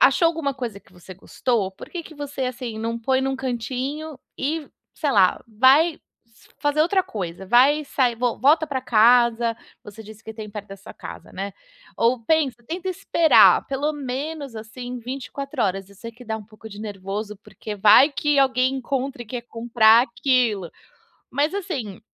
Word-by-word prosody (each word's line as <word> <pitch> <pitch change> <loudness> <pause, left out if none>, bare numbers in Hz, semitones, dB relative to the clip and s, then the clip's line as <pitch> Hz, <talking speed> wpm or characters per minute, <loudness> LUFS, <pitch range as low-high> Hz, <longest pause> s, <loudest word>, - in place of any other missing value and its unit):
achou 275 +6 +5
alguma 315 -4 -2
coisa 240 -6 -5
que - - -26
você 180 +1 -12
gostou? 205 +2 -2
Por - - -12
que 345 -2 -5
que 315 - -12
você, 285 -2 -5
assim, 245 -3 -5
não 230 +1 -2
põe 260 +3 +1
num 270 0 -1
cantinho 260 +4 -4 0.2
e, 300 +2 -2 0.3
sei 295 - -1
lá, 190 -3 +3
vai 270 +9 +4 0.6
fazer 290 +1 +2
outra 380 +4 +2
coisa, 190 - -6
vai 275 +7 +4
sair 250 -4 0
vo 245 0 -1
volta 310 +4 +4
para 270 -3 -3
casa 235 0 +4 0.3
você 205 +2 -11
disse 215 0 -13
que 220 - -8
tem 215 -1 -8
perto 205 0 -7
da 195 - -9
sua 195 - -12
casa, - - -10
né, 195 +1 -5 0.4
ou 235 +1 +2
pensa, 305 -5 +1
tenta 360 +5 -4
esperar, 335 -3 +5
pelo 280 +3 -1
menos, 280 -1 -5
assim, 245 +3 -7
24 270 +2 -5
horas. 195 -1 -1
Eu - - -16
sei 230 - -8
que 245 +2 -14
dá 220 -1 -3
um 215 - -10
pouco 220 +1 -13
de 205 0 -10
nervoso, 205 0 -5
porque 210 0 -9
vai 215 +8 +7
que 290 0 0
alguém 260 -1 +3
encontre 265 0 -3
e - - -25
quer 240 +2 -5
comprar 230 -1 +4
aquilo. 235 - 0 0.6
Mas, 295 +4 0
assim, 275 - -4
250 Hz, 175 wpm, -23 LUFS, 220-280 Hz, 0.6 s, vai